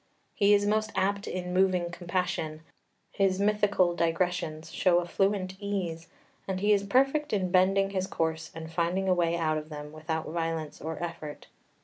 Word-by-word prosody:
He 205 0 +5
is 205 0 +2
most 215 +1 +1
apt 200 +1 0
in 180 -1 -4
moving 180 -2 +2
compassion; 175 -3 -2 0.5
his 195 -1 +1
mythical 200 -3 +3
digressions 165 -2 -1
show 180 -2 +3
a 175 - +1
fluent 190 +1 0
ease, 185 -5 -3 0.4
and 190 -1 -2
he 210 +2 +4
is 200 - +3
perfect 270 +8 +2
in 185 -3 0
bending 195 +1 +3
his 190 -1 -1
course 160 -2 -2
and 160 0 -7
finding 180 +3 0
a 185 - +5
way 170 -1 +1
out 155 -2 +1
of 155 +1 -11
them 150 -1 -7
without 160 +1 -3
violence 165 -2 -3
or 160 0 -4
effort. 165 -3 -6
180 Hz, 165 wpm, -29 LUFS, 165-195 Hz, 0.5 s, He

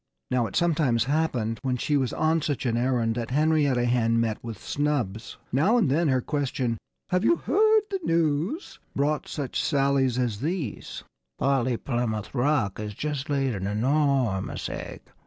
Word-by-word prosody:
Now, 125 -2 +2
it - - -9
sometimes 155 -9 +2
happened, 125 -6 0
when 130 -2 -1
she 145 +4 0
was 135 -3 +1
on 160 +1 +1
such 145 -3 -2
an 120 -2 +1
errand, 120 -2 +1
that 115 0 -4
Henrietta 145 -3 +2
Hen 115 -1 +2
met 115 -2 -1
with 115 -3 -6
snubs. 130 -8 -2
Now 175 - +3
and 185 - +2
then 165 +4 +2
her 130 -2 +2
question 130 -5 -2 0.3
"Have 180 +2 +1
you 335 - +5
heard 430 - +3
the 390 - -1
news?" 165 - 0 0.2
brought 145 +2 0
some 145 - -3
such - - -2
sallies 135 -3 +2
as 120 -5 -1
these: 155 - -4 0.3
"Polly 130 -3 +1
Plymouth 120 -5 -2
Rock 125 -7 +1
has 105 -1 -5
just 150 +2 -3
laid 135 -3 +1
an 95 -1 -3
enormous 125 -2 0
egg! - - -6
135 Hz, 165 wpm, -26 LUFS, 120-150 Hz, 0.3 s, you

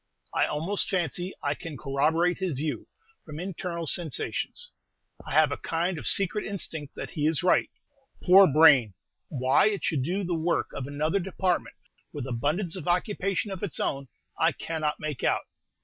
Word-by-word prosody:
I - - +2
almost 165 +7 -1
fancy 180 0 -1
I 145 - +1
can 150 0 -8
corroborate 160 +6 +1
his 185 -4 -1
view, 145 +3 -3 0.4
from 150 -1 -8
internal 175 -2 -4
sensations; 175 - 0 0.5
I - - -7
have - - +5
a - - -2
kind 170 +1 -2
of - - -3
secret 200 +2 +2
instinct 160 -7 -3
that - - -6
he 150 -1 0
is 160 +1 0
right. 180 - +3 0.5
Poor 190 +1 +8
brain! 140 - +6 0.3
why 130 +7 +3
it 205 -2 -1
should 150 -5 0
do 180 +9 -1
the 175 -1 -2
work 165 +1 0
of 135 - -5
another 155 +6 0
department, 185 -1 -1 0.4
with 145 -4 -5
abundance 150 - -1
of 180 -4 -7
occupation 195 +2 0
of 190 - -6
its 200 -6 -3
own, 135 0 -2 0.3
I - - +3
cannot 155 -2 -3
make 150 -4 -5
out. - - +1
165 Hz, 165 wpm, -27 LUFS, 150-185 Hz, 0.5 s, Poor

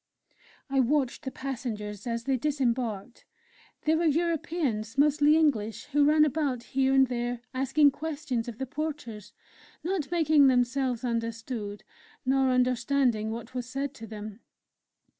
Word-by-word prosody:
I 275 -1 0
watched 265 0 +1
the 265 - -3
passengers 220 -6 -5
as 230 0 -2
they 270 +2 +1
disembarked. 245 -6 -2 0.6
They 310 - +3
were 330 +1 +1
Europeans, 305 -8 -1
mostly 295 +1 +4
English, 230 -8 +1
who 290 0 +4
ran 305 +1 +5
about, 280 -5 -1
here 265 +2 +1
and 270 0 +6
there, 240 -1 -3
asking 270 +3 +3
questions 285 -6 -3
of 235 -3 -6
the 265 - -3
porters, 280 -7 -5 0.5
not 345 -5 -2
making 310 -4 +4
themselves 250 -1 +1
understood, 230 -3 -3 0.4
nor 265 0 +3
understanding 250 -2 +1
what 230 +2 -6
was 250 -1 -4
said 275 +1 -3
to 225 -4 -10
them. 215 0 -8
260 Hz, 135 wpm, -28 LUFS, 230-290 Hz, 0.6 s, and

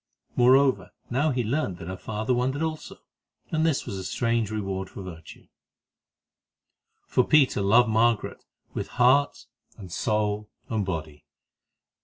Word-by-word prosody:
Moreover, 130 +2 +4 0.2
now 140 +6 +2
he 125 -3 0
learned 110 - -1
that 85 - -9
her 95 - -4
father 110 +5 -2
wondered 130 +5 0
also, 155 -1 -4 0.6
and 160 -1 +1
this 160 -4 +1
was 95 - -5
a - - -6
strange 115 +2 0
reward 95 -3 -3
of 95 - -6
virtue. 80 -3 -11 1.6
For 125 - +2
Peter 135 -6 +3
loved 115 +4 +4
Margaret 115 0 +1 0.3
with - - -4
heart 130 +2 +3 0.3
and 95 -5 -10
soul 105 +3 -1 0.2
and 110 -2 0
body. 80 -6 -5
110 Hz, 135 wpm, -26 LUFS, 95-130 Hz, 1.6 s, Moreover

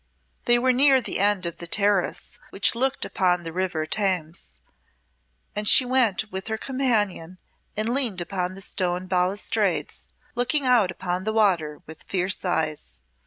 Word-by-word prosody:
They 240 0 +4
were 255 +1 +2
near 270 +1 +5
the 240 - -3
end 200 -2 +2
of 170 - -5
the 170 - -8
terrace 200 0 0
which 195 -1 +3
looked 265 +3 -1
upon 180 -2 0
the 165 -1 -7
River 175 -4 -2
Thames, 180 -3 -2 1.0
and 210 0 -1
she 255 - +8
went 230 -5 +1
with 190 +2 -6
her 220 0 -2
companion 215 -10 -2 0.4
and 220 +3 -1
leaned 245 -9 +1
upon 180 +1 -3
the 195 - -8
stone 180 -2 -2
balustrades, 185 +2 -1 0.3
looking 255 +4 0
out 240 -7 +4
upon 180 0 -4
the 220 +2 -2
water 180 -8 +1
with 160 0 -12
fierce 185 0 -1
eyes. 160 - -2
195 Hz, 155 wpm, -24 LUFS, 180-230 Hz, 1.0 s, she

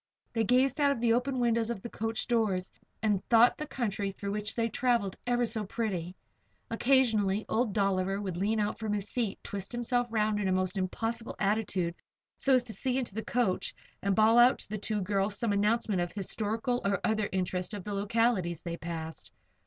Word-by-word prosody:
They 225 -1 +1
gazed 260 +5 +2
out 285 - +5
of 280 - -1
the 230 -1 +3
open 250 +2 0
windows 230 -1 +2
of 220 -5 -4
the - - -4
coach 225 0 -2
doors 210 -6 0 0.3
and 205 -3 +1
thought 235 +1 +6
the 305 - -4
country 205 -7 -2
through 200 +1 -5
which 210 +1 -3
they 230 -1 +1
traveled 230 -5 0
ever 245 0 +2
so 225 -1 -1
pretty. 190 -5 -3 0.6
Occasionally 225 -5 +2
old 230 -1 +1
Dolliver 195 -1 +1
would 190 -4 -4
lean 210 +5 0
out 210 0 -1
from 220 -2 -2
his 205 -1 -2
seat, 230 -6 -1
twist 195 -1 -5
himself 240 0 0
around 215 -1 +1
in 200 - 0
a - - +1
most 185 0 0
impossible 225 +5 -3
attitude 195 -4 0 0.4
so 270 -1 +4
as 250 - +3
to 230 -3 -6
see 255 +1 -1
into 245 -6 -2
the 220 +2 -3
coach, 235 -7 0 0.3
and 200 -1 +1
bawl 220 +3 +5
out 245 +2 +6
to - - -7
the 215 0 -3
two 210 0 -1
girls 200 +1 +1
some 225 -1 0
announcement 210 -1 +1
of 175 - -1
the - - -19
historical 225 +5 -1
or 200 -1 +1
other 215 -1 +1
interest 185 +1 -2
of 200 - -6
the 205 - -4
localities 200 -4 +1
they 170 -1 -4
passed. 165 -1 -6
215 Hz, 200 wpm, -30 LUFS, 195-235 Hz, 0.6 s, thought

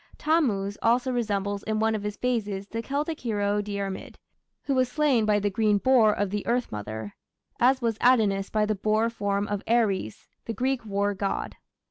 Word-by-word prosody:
Tammuz 210 -11 +1
also 245 +3 +2
resembles 205 -4 -1
in 215 0 -2
one 220 +1 +2
of 215 - -2
his 210 0 -4
phases 210 -6 -2
the 230 +2 -4
Celtic 295 +5 -3
hero 205 -3 0
Diarmid, 200 -2 -5 0.5
who 280 - -1
was 255 -1 +2
slain 275 -5 +2
by 210 -1 +4
the 205 0 -1
"green 210 0 +2
boar" 235 -1 +4
of 205 -2 -1
the 210 0 -2
Earth 245 +1 0
Mother, 105 0 -6 0.5
as 260 +1 +3
was 225 -2 0
Adonis 210 -6 +3
by 215 -1 +1
the 215 - 0
boar 215 +3 +1
form 205 -2 -1
of 205 -1 -2
Ares, 210 - 0 0.2
the 230 - -3
Greek 260 +2 -1
war 200 0 0
god. 195 0 -3
215 Hz, 180 wpm, -26 LUFS, 200-240 Hz, 0.5 s, by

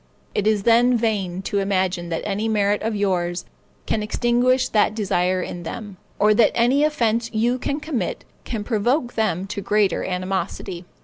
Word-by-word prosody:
It 210 - 0
is 215 -2 +2
then 240 +2 +4
vain 195 -5 -1
to 200 +1 -1
imagine 185 -3 0
that 165 - -3
any 210 +2 -1
merit 205 -1 +1
of 220 0 -1
yours 180 -3 -1 0.4
can 220 - 0
extinguish 245 +4 +2
that 210 0 +2
desire 185 -3 0
in 175 - -6
them, 200 +3 -7 0.2
or 210 +1 +4
that 215 +1 +4
any 250 +5 +3
offense 235 -6 +1
you 240 +3 +1
can 285 +3 -2
commit, 285 - -3 0.2
can 225 -3 -4
provoke 240 +4 0
them 195 -5 0
to 200 +1 -5
greater 205 0 +1
animosity. 185 -1 -3
210 Hz, 165 wpm, -22 LUFS, 190-235 Hz, 0.4 s, then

